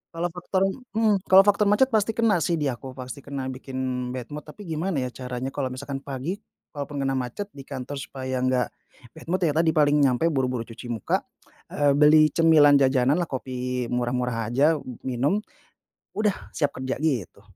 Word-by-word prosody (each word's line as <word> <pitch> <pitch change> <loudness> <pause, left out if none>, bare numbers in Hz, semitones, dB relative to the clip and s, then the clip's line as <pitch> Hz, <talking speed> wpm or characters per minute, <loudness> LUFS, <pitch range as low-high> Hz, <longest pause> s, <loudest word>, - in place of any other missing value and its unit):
kalau 170 +1 -1
faktor, 180 +2 -1 0.3
mmm, 215 -3 +3
kalau 190 +1 +8
faktor 205 0 +3
macet 235 +6 +4
pasti 220 -1 +1
kena, 225 -5 +3
sih, 165 +2 +1
di 145 -4 0
aku, 130 +1 -8
pasti 130 0 -7
kena, 135 -1 -5
bikin 130 0 -9 0.4
bad 125 +1 -7
mood, 150 +1 -7
tapi 205 +7 -11
gimana, 165 +1 -2
ya, 125 - -4
caranya 125 +1 -5
kalau 135 -1 -2
misalkan 135 +2 -5
pagi, 140 +8 -5 0.3
kalau 145 -2 -5
pun 145 -1 -4
kena 135 0 0
macet 130 - -5
di 140 - -11
kantor 135 +1 -5
supaya 130 -1 -4
nggak 130 0 +1 0.4
bad - - -14
mood, 180 +2 0
ya, 160 - +3
tadi, 160 +1 +2
paling 150 -1 +4
nyampe 140 +4 +3
buru-buru 130 -4 -1
cuci 115 +2 -10
muka, 115 -4 -1 0.5
eee, 145 -1 +2
beli 155 0 +6
cemilan, 150 -4 +6
jajanan, 135 +3 +3
lah, 175 - -1
kopi 125 -2 -3
murah-murah 120 -2 -1
aja, 150 +4 +4 0.3
minum, 135 - 0 0.7
udah, 210 -2 -1
siap 145 -2 +1
kerja, 130 0 -2
gitu. 130 - -2
140 Hz, 180 wpm, -25 LUFS, 130-165 Hz, 0.7 s, kalau